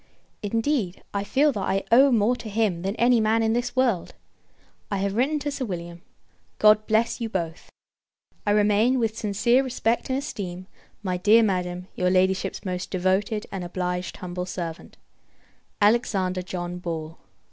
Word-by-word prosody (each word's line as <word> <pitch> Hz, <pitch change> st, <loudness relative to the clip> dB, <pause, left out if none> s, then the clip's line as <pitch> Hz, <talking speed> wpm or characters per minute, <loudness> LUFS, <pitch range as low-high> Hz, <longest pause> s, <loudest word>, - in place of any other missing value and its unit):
Indeed, 225 Hz, -2 st, -1 dB
I 200 Hz, 0 st, -1 dB
feel, 280 Hz, +8 st, +3 dB
that 210 Hz, -, -4 dB
I 195 Hz, 0 st, 0 dB
owe 265 Hz, +4 st, +7 dB
more 230 Hz, +1 st, +3 dB
to 230 Hz, -2 st, -8 dB
him 205 Hz, -5 st, 0 dB
than 195 Hz, +3 st, -2 dB
any 240 Hz, 0 st, +4 dB
man 220 Hz, +1 st, +2 dB
in 220 Hz, 0 st, +2 dB
this 240 Hz, +1 st, -2 dB
world. 240 Hz, -9 st, +1 dB, 0.7 s
I -, -, -1 dB
have 195 Hz, 0 st, -1 dB
written 275 Hz, +6 st, +1 dB
to 290 Hz, 0 st, -3 dB
Sir 280 Hz, -1 st, -4 dB
William; 170 Hz, -4 st, -6 dB, 0.6 s
God 215 Hz, 0 st, +5 dB
bless 225 Hz, +3 st, +1 dB
you 230 Hz, -, -2 dB
both! 170 Hz, -5 st, -4 dB, 0.7 s
I -, -, -1 dB
remain, 210 Hz, +4 st, +3 dB
with 225 Hz, -3 st, 0 dB
sincere 225 Hz, +4 st, +2 dB
respect 240 Hz, -2 st, -1 dB
and 260 Hz, -, +1 dB
esteem, 185 Hz, -9 st, -5 dB, 0.4 s
my 185 Hz, -2 st, -1 dB
dear 215 Hz, +5 st, +5 dB
Madam, 180 Hz, -3 st, -1 dB
your 180 Hz, 0 st, 0 dB
Ladyship's 190 Hz, +1 st, +1 dB
most 180 Hz, -1 st, -3 dB
devoted 190 Hz, +4 st, 0 dB
and 190 Hz, -2 st, -4 dB
obliged 180 Hz, 0 st, -3 dB
humble 180 Hz, 0 st, -5 dB
servant, 170 Hz, -3 st, -6 dB, 0.9 s
ALEXANDER 200 Hz, -4 st, +2 dB
JOHN 180 Hz, -1 st, -5 dB
BALL. 165 Hz, -2 st, -5 dB
205 Hz, 160 wpm, -25 LUFS, 180-230 Hz, 0.9 s, owe